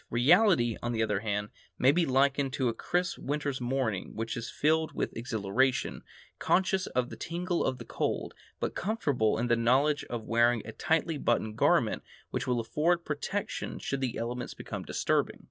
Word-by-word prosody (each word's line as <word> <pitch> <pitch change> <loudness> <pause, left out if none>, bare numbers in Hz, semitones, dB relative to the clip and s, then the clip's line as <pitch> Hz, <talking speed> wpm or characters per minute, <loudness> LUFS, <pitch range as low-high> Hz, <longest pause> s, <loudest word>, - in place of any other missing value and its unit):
Reality, 130 - +4
on 120 0 -2
the 110 -1 +1
other 105 -3 0
hand, 105 -1 -2 0.3
may 130 - +5
be 170 +2 +2
likened 135 0 +2
to 130 -3 +1
a - - -1
crisp 175 +9 -1
winter's 145 -2 -2
morning 120 -6 -1
when 115 - -2
one 110 - -3
is 115 -1 -5
filled 160 +1 +1
with - - -3
exhilaration, 120 +2 0 0.4
conscious 190 0 +2
of 125 0 -1
the - - -6
tingle 175 +1 -2
of 130 - 0
the - - -9
cold, - - -2 0.3
but - - -2
comfortable 145 - 0
in 120 - 0
the 120 -1 +3
knowledge 130 +6 +3
of 120 -2 -5
wearing 115 0 +3
a 110 - -6
tightly 160 +3 0
buttoned 110 -4 0
garment - - +3 0.3
which 125 0 -2
will 125 -1 +1
afford 165 +9 +1
protection 155 +7 -3
should 140 -1 -3
the 125 -3 -1
elements 120 +2 -4
become - - -6
disturbing. - - 0
130 Hz, 180 wpm, -30 LUFS, 115-150 Hz, 0.4 s, may